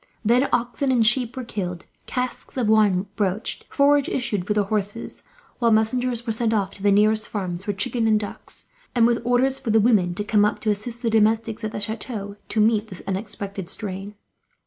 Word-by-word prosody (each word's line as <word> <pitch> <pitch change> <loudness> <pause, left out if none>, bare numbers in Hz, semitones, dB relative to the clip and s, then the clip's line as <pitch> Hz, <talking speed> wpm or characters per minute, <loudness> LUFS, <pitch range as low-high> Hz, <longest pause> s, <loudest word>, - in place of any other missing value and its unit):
Then 245 +5 +3
oxen 245 +3 0
and 240 -3 +3
sheep 240 +1 +2
were 255 - -3
killed, 180 -7 -5 0.2
casks 250 +1 -3
of 245 -4 +1
wine 210 -4 +4
broached, 205 +2 -1
forage 285 0 +3
issued 205 -8 -2
for 210 - 0
the 210 - +3
horses; 205 +2 -3 0.4
while 235 -1 +3
messengers 235 +2 +1
were 225 - 0
sent 225 0 0
off 200 -3 0
to - - -13
the 205 - +3
nearest 215 +2 +3
farms 185 -3 -4
for 205 - 0
chicken 225 +4 0
and 215 -1 +4
ducks, 205 -1 -7 0.3
and 235 -2 +5
with 235 0 +2
orders 250 +3 +2
for - - -5
the 220 +1 +5
women 205 -6 +3
to 205 - -2
come 210 0 +3
up, 210 - +1
to 215 - +1
assist 230 +4 -5
the 230 - +1
domestics 220 +1 +2
at 215 - -2
the - - -4
chateau 210 -1 -4
to 220 - 0
meet 215 0 +3
this 185 -4 -9
unexpected 195 -1 -4
strain. 200 0 -5
215 Hz, 200 wpm, -23 LUFS, 205-235 Hz, 0.4 s, and